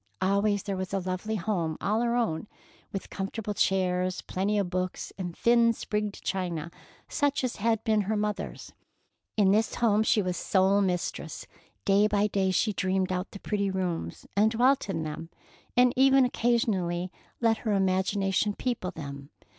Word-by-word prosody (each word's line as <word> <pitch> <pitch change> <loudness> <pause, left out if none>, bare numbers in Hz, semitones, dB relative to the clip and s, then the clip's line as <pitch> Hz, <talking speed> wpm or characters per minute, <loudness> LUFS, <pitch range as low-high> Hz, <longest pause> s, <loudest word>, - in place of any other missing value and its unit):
Always 200 +1 +1
there 195 -2 -3
was 185 +1 -3
a - - +1
lovely 185 +4 -3
home 170 -6 -1
all 215 +3 0
her 240 0 +1
own, 210 -7 -1 0.4
with 195 - -6
comfortable 205 +2 -4
chairs 185 -2 +1
and - - -31
plenty 200 +3 0
of 195 -3 -1
books, 185 0 -3
and 175 -3 -6
thin, 235 0 +4
sprigged 210 -2 -3
china, 170 -4 -2 0.4
such 285 -2 0
as 250 -1 -2
had 225 +1 +1
been 220 -2 +2
her 210 +2 -1
mother's. 210 0 -3 0.6
In 195 -2 +5
this 220 +2 +2
home 215 -3 +3
she 220 - +3
was 180 -1 -2
sole 195 +2 +3
mistress. 180 -3 -2 0.4
Day 200 +1 +4
by 205 -1 +2
day 195 -2 +1
she 210 +3 +1
dreamed 190 0 0
out 180 +2 -2
the 200 - -10
pretty 200 -1 -1
rooms, 185 -3 -3
and 210 +2 +4
dwelt 245 +1 +2
in 165 -4 -1
them, 155 +2 -6 0.5
and 250 0 +5
even 270 0 +5
occasionally 190 -8 0 0.3
let 230 -2 +3
her 220 -3 -1
imagination 195 +1 +1
people 240 -7 -2
them. 140 -3 -8
200 Hz, 165 wpm, -28 LUFS, 185-220 Hz, 0.6 s, In